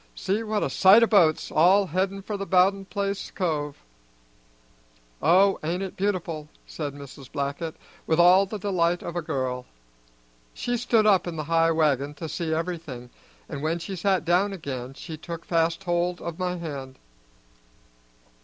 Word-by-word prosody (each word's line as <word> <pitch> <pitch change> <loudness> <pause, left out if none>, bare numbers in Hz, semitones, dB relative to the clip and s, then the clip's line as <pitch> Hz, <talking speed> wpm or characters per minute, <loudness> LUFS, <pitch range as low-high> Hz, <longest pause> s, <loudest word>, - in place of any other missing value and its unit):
See 200 - -1
what 215 -1 -1
a - - 0
sight 205 +4 +7
o' - - +7
boats, 180 -9 +3
all 185 +6 +5
headin' 190 +3 -2
for 210 - -4
the 195 0 -5
Bowden 195 +1 +3
place 200 0 -3
cove!" 150 -6 -3 1.4
"Oh, 190 +4 +4
ain't 175 +5 -2
it 190 - -6
beautiful!" 170 -6 -2 0.2
said 145 -3 -5
Mrs. 140 -1 -11
Blackett, 140 +3 -3 0.3
with 160 +1 +2
all 185 +3 +6
the 215 - -5
delight 175 -4 0
of 170 - -6
a 175 - -1
girl. 130 -5 -3 0.9
She 245 - -2
stood 230 -2 +2
up 195 -4 +4
in 170 - -4
the 155 - -3
high 165 +2 +2
wagon 150 -3 +1
to 160 - -6
see 165 0 -3
everything, 160 -7 -4 0.4
and 140 -3 -6
when 160 +3 0
she 175 +3 -6
sat 190 0 0
down 185 +4 +2
again 135 -7 -6
she 160 +1 -8
took 165 +1 -8
fast 165 +2 0
hold 175 0 0
of 170 0 -6
my 180 -1 -1
hand. 140 -6 -7
170 Hz, 165 wpm, -25 LUFS, 155-195 Hz, 1.4 s, sight